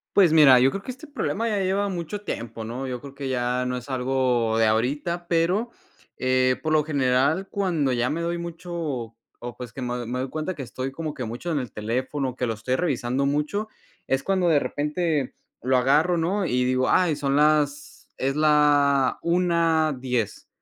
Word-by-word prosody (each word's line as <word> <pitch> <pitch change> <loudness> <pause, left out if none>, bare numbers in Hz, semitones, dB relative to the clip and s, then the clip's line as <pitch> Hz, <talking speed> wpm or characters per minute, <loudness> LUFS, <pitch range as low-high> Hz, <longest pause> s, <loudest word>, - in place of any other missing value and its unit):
Pues 185 -6 +6
mira, 140 -6 +7
yo 135 +2 +4
creo 195 - -4
que 255 - -6
este 285 +5 -12
problema 230 - -2
ya 205 -2 0
lleva 195 +2 0
mucho 180 +3 -4
tiempo, 115 - -5
¿no? 125 +4 -5
Yo 125 -1 -5
creo 140 -1 -10
que 140 -1 -6
ya 125 0 -1
no 125 0 -2
es 125 +2 -7
algo 125 -3 +1
de 115 - +4
ahorita, 145 +11 0
pero, 180 +8 +1 0.4
eh, 130 0 +2
por 155 - -1
lo 155 -1 +3
general, 140 +5 +1
cuando 170 -9 0
ya 120 0 0
me 160 +3 -2
doy 170 +1 -1
mucho 170 +1 -7 0.7
o 120 -1 -6
pues, 120 -2 -8
que 135 - -7
me 125 -1 -3
me 125 +2 -3
doy 130 - -3
cuenta 155 +5 -3
que - - -7
estoy 130 +2 -5
como 155 0 -4
que 125 - -5
mucho 120 +10 -5
en 150 - 0
el 125 -5 -6
teléfono, 130 +5 -2
que 125 - -1
lo 115 - -1
estoy 125 +4 -2
revisando 135 -4 0
mucho, 150 +10 -1 0.4
es 135 +1 0
cuando 190 -2 +1
de 155 -4 +4
repente 150 -2 -1 0.3
lo 130 +1 +1
agarro, 150 +8 +3
¿no? 185 +5 0
Y 125 -5 +1
digo: 130 0 +1
"Ay 175 -5 +3
son 140 -1 0
las 150 -1 +1
es 135 +2 -1
la 145 -3 +3
1:10", 160 - 0
140 Hz, 190 wpm, -24 LUFS, 125-170 Hz, 0.7 s, mira